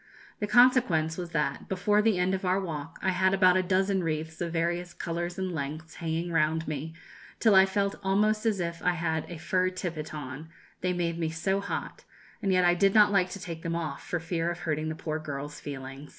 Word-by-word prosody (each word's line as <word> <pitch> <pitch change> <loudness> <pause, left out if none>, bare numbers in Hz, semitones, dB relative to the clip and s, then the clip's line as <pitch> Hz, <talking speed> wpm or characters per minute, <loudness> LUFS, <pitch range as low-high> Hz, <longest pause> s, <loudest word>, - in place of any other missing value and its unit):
The 210 - -1
consequence 240 -11 +4
was 175 -1 -5
that, 150 -3 -2
before 200 +3 +2
the 215 -3 +2
end 180 +1 +1
of 190 +1 -2
our 185 +1 +2
walk, 165 -4 -5
I 190 - +2
had 190 +1 +2
about 185 -2 +5
a 185 - +4
dozen 190 +1 +1
wreaths 160 0 -3
of 170 -1 -2
various 170 +1 -1
colours 175 +1 -3
and 190 -1 -2
lengths, 155 +2 -5
hanging 165 +1 -2
round 160 0 +1
me, 155 +2 -4 0.4
till 220 -3 +5
I 190 0 +7
felt 200 0 0
almost 210 +2 +2
as 210 -3 +1
if 170 -1 -3
I 180 - +2
had 160 -2 -2
a 175 - -6
fur 185 +3 +1
tippet 170 -4 -5
on, 150 +1 -7 0.3
they 180 - +1
made 170 -2 -1
me 165 -1 0
so 190 +5 0
hot; - - -5 0.4
and 195 - +1
yet 185 -1 +4
I 175 - +5
did 195 +3 +3
not 210 -1 +7
like 190 -2 +3
to 200 - -7
take 165 -3 -6
them 165 0 -2
off, 165 -2 -3
for 175 - -2
fear 165 +1 -1
of 175 0 -5
hurting 155 -2 -1
the 155 - -3
poor 155 -1 -3
girls' 145 -1 -6
feelings." 135 0 -7
175 Hz, 220 wpm, -28 LUFS, 160-190 Hz, 0.4 s, I